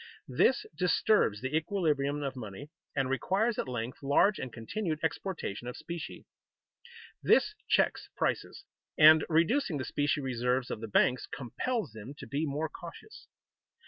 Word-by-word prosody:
This -, -, +3 dB
disturbs 180 Hz, -, +2 dB
the 130 Hz, +3 st, -2 dB
equilibrium 150 Hz, -5 st, 0 dB
of 135 Hz, -1 st, -3 dB
money 125 Hz, +5 st, -8 dB, 0.2 s
and 135 Hz, -2 st, +1 dB
requires 195 Hz, -, 0 dB
at -, -, -2 dB
length 120 Hz, -1 st, -4 dB
large 145 Hz, +9 st, +3 dB
and 130 Hz, -, -5 dB
continued 155 Hz, -, -3 dB
exportation 160 Hz, -, -3 dB
of 125 Hz, -, -6 dB
specie. 170 Hz, -2 st, -7 dB, 1.0 s
This 425 Hz, -, +4 dB, 0.2 s
checks -, -, +2 dB
prices, -, -, -1 dB, 0.3 s
and, 155 Hz, 0 st, +8 dB
reducing 170 Hz, -, +2 dB
the 130 Hz, -, -3 dB
specie 145 Hz, +1 st, 0 dB
reserves 125 Hz, -1 st, -1 dB
of 110 Hz, -, -4 dB
the 115 Hz, -, -4 dB
banks, 125 Hz, +4 st, +2 dB
compels 160 Hz, -, -3 dB
them 110 Hz, +6 st, -9 dB
to -, -, -8 dB
be 150 Hz, +3 st, -2 dB
more 150 Hz, +3 st, -1 dB
cautious. 170 Hz, -, -11 dB
145 Hz, 145 wpm, -30 LUFS, 125-170 Hz, 1.0 s, and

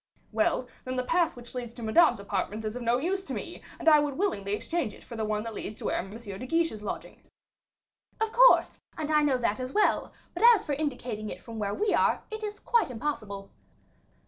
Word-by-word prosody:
"Well, 325 Hz, -6 st, +1 dB, 0.2 s
then 255 Hz, 0 st, -4 dB
the 255 Hz, -, 0 dB
path 335 Hz, +4 st, +1 dB
which 245 Hz, -1 st, -11 dB
leads 240 Hz, -2 st, -5 dB
to 240 Hz, -, -8 dB
Madame's 240 Hz, +1 st, +5 dB
apartments 200 Hz, +2 st, -3 dB
is 215 Hz, +1 st, -3 dB
of 250 Hz, -, -5 dB
no 235 Hz, +1 st, +2 dB
use 375 Hz, +8 st, -1 dB
to -, -, -4 dB
me, -, -, -6 dB, 0.2 s
and -, -, -7 dB
I 305 Hz, -2 st, +8 dB
would 290 Hz, -2 st, -1 dB
willingly 205 Hz, -, 0 dB
exchange 330 Hz, -1 st, -2 dB
it -, -, -16 dB
for 235 Hz, -, -9 dB
the 220 Hz, -1 st, -2 dB
one 210 Hz, 0 st, -1 dB
that 230 Hz, -1 st, -5 dB
leads 210 Hz, 0 st, -6 dB
to -, -, -8 dB
where -, -, +1 dB
M. 190 Hz, -, -4 dB
de 220 Hz, +1 st, -7 dB
Guiche 330 Hz, +3 st, +2 dB
is 215 Hz, -, -8 dB
lodging." 210 Hz, -, -6 dB, 1.0 s
"Of 445 Hz, 0 st, 0 dB
course, -, -, +6 dB, 0.2 s
and 310 Hz, -1 st, -2 dB
I 300 Hz, 0 st, +5 dB
know 285 Hz, -3 st, +3 dB
that 230 Hz, -3 st, 0 dB
as 255 Hz, +1 st, -4 dB
well; 420 Hz, -, +2 dB, 0.2 s
but 350 Hz, -, -5 dB
as 415 Hz, -, -4 dB
for 295 Hz, -, -1 dB
indicating 250 Hz, -7 st, -3 dB
it -, -, -7 dB
from 230 Hz, -1 st, -8 dB
where 205 Hz, -1 st, -1 dB
we 420 Hz, +1 st, +1 dB
are, -, -, +2 dB
it 435 Hz, 0 st, -5 dB
is 420 Hz, -1 st, -4 dB
quite 470 Hz, -, +2 dB
impossible." 215 Hz, -6 st, -4 dB
255 Hz, 225 wpm, -28 LUFS, 215-330 Hz, 1.0 s, I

